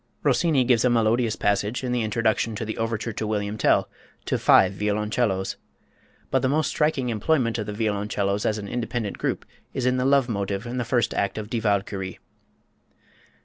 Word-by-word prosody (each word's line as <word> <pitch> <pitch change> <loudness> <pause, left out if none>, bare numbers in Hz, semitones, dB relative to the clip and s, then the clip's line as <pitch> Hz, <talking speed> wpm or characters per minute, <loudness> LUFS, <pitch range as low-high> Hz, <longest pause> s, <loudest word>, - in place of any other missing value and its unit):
Rossini 145 0 +3
gives 120 -2 +3
a 125 - +4
melodious 115 0 +2
passage, 105 +4 0
in 125 - -2
the 125 -1 +1
introduction 110 0 0
to 110 - -4
the 110 - -4
overture 115 0 -2
to 110 - -3
"William 105 -1 -2
Tell," 110 - +2 0.4
to - - 0
five 95 0 +5
violoncellos. 105 0 -1 0.7
But - - +2
the 130 - +1
most 155 +2 +1
striking 150 -5 0
employment 115 +1 +1
of 105 - -4
the 105 - -4
violoncellos 105 -1 -1
as 110 - 0
an 100 -1 -6
independent 120 -2 -3
group - - -2 0.3
is 130 -2 -1
in 125 0 +2
the 125 - 0
Love 135 -2 +4
Motive 100 -2 -2
in 120 +1 -4
the 120 - -1
first 120 0 +1
act 100 +1 -1
of 110 0 -6
"Die 120 - 0
Walküre." 100 -3 -1
110 Hz, 185 wpm, -24 LUFS, 105-125 Hz, 0.7 s, five